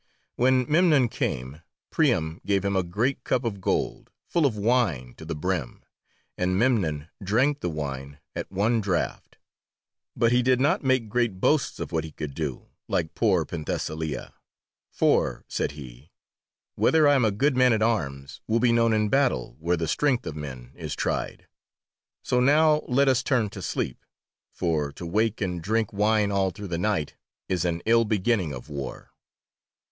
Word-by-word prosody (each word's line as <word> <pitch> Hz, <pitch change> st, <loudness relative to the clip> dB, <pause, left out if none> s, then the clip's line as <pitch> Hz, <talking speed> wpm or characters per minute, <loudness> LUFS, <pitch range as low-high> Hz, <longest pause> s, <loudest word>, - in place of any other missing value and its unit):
When 130 Hz, +1 st, +3 dB
Memnon 150 Hz, -6 st, +4 dB
came, 65 Hz, -, -3 dB, 0.3 s
Priam 90 Hz, -, +1 dB
gave 100 Hz, -1 st, 0 dB
him 100 Hz, 0 st, 0 dB
a 95 Hz, -, +3 dB
great 115 Hz, +9 st, -1 dB
cup 125 Hz, -, 0 dB
of 105 Hz, -5 st, -3 dB
gold, -, -, -1 dB, 0.2 s
full 165 Hz, -4 st, +2 dB
of 110 Hz, -5 st, -3 dB
wine 100 Hz, -, +1 dB
to 80 Hz, -, -10 dB
the 80 Hz, -, -4 dB
brim, 75 Hz, -5 st, -3 dB, 0.6 s
and 90 Hz, 0 st, +1 dB
Memnon 95 Hz, -, +1 dB
drank 130 Hz, +9 st, +2 dB
the 90 Hz, -, -2 dB
wine 70 Hz, -2 st, -5 dB, 0.2 s
at -, -, -5 dB
one 110 Hz, +4 st, +1 dB
draught. 95 Hz, -4 st, -2 dB, 0.8 s
But 115 Hz, 0 st, +2 dB
he 125 Hz, 0 st, +4 dB
did 125 Hz, 0 st, +3 dB
not 150 Hz, +8 st, +2 dB
make 130 Hz, -4 st, +2 dB
great 115 Hz, -3 st, 0 dB
boasts 150 Hz, +7 st, +1 dB
of -, -, -5 dB
what 80 Hz, -1 st, 0 dB
he 80 Hz, -, -8 dB
could 75 Hz, -1 st, -6 dB
do, 75 Hz, -4 st, -5 dB, 0.2 s
like 80 Hz, -1 st, -1 dB
poor 95 Hz, -8 st, +2 dB
Penthesilea, 80 Hz, -1 st, -4 dB, 0.6 s
"for," -, -, +1 dB
said -, -, -2 dB
he, 65 Hz, 0 st, -12 dB, 0.6 s
"whether 160 Hz, -2 st, +4 dB
I 145 Hz, -, +6 dB
am 135 Hz, -3 st, +3 dB
a 110 Hz, -, +4 dB
good 130 Hz, +8 st, +1 dB
man 125 Hz, 0 st, +5 dB
at 110 Hz, -1 st, +2 dB
arms 70 Hz, -11 st, -2 dB
will 115 Hz, +1 st, +2 dB
be 120 Hz, 0 st, +3 dB
known 115 Hz, -1 st, +3 dB
in 105 Hz, -1 st, +2 dB
battle, 130 Hz, -, +1 dB
where 85 Hz, +2 st, 0 dB
the 80 Hz, 0 st, -2 dB
strength 130 Hz, -, +1 dB
of 75 Hz, -, -5 dB
men 65 Hz, -5 st, -8 dB
is -, -, -6 dB
tried. -, -, -3 dB, 0.8 s
So 125 Hz, -, +1 dB
now 150 Hz, +4 st, +4 dB
let 135 Hz, +3 st, +3 dB
us 130 Hz, -1 st, +3 dB
turn 120 Hz, -7 st, +1 dB
to -, -, -8 dB
sleep, 60 Hz, -, -3 dB, 0.5 s
for 75 Hz, -4 st, -1 dB
to 85 Hz, -, -8 dB
wake 110 Hz, +6 st, 0 dB
and 90 Hz, -3 st, -2 dB
drink 110 Hz, +4 st, 0 dB
wine 105 Hz, 0 st, +2 dB
all 95 Hz, -1 st, +2 dB
through 100 Hz, +2 st, -8 dB
the 85 Hz, -1 st, -2 dB
night 95 Hz, -6 st, -1 dB, 0.3 s
is 90 Hz, -1 st, 0 dB
an 85 Hz, -1 st, -1 dB
ill 115 Hz, +1 st, +5 dB
beginning 105 Hz, -5 st, 0 dB
of 65 Hz, -1 st, -8 dB
war." 70 Hz, -3 st, -7 dB
100 Hz, 170 wpm, -26 LUFS, 80-125 Hz, 0.8 s, I